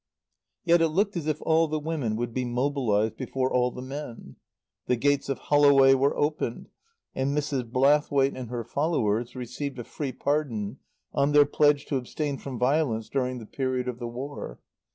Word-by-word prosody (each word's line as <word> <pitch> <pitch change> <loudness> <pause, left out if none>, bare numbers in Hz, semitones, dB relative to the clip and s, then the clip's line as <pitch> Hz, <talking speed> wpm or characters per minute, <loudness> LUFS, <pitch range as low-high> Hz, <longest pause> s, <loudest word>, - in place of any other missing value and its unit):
Yet 170 -1 +5
it 165 - +4
looked 195 +6 0
as 165 -3 -3
if 155 -1 0
all 160 0 +3
the 155 0 -2
women 150 -8 -2
would 120 +1 -3
be 130 - -1
mobilized 120 -4 0
before 130 -1 -2
all 125 0 +3
the 125 0 -8
men. 130 - -8 0.5
The 125 - +3
gates 140 +3 +1
of 135 - -1
Holloway 140 -2 +5
were 135 +1 +2
opened, 145 -5 -2 0.4
and 135 +2 -1
Mrs. 140 -5 -2
Blathwaite 140 +1 +3
and 125 -3 -6
her 120 -1 -3
followers 120 -4 -1
received 130 +2 -5
a 120 - -5
free 140 +3 -5
pardon 130 -7 -2 0.3
on 140 +1 +2
their 145 0 +7
pledge 145 0 +2
to 140 - -1
abstain 140 +3 -3
from 135 -3 -6
violence 125 -4 +1
during 130 -2 -1
the 115 - -8
period 130 +1 -2
of 125 -1 -4
the 120 - -4
War. 125 - -7
135 Hz, 175 wpm, -27 LUFS, 125-145 Hz, 0.5 s, their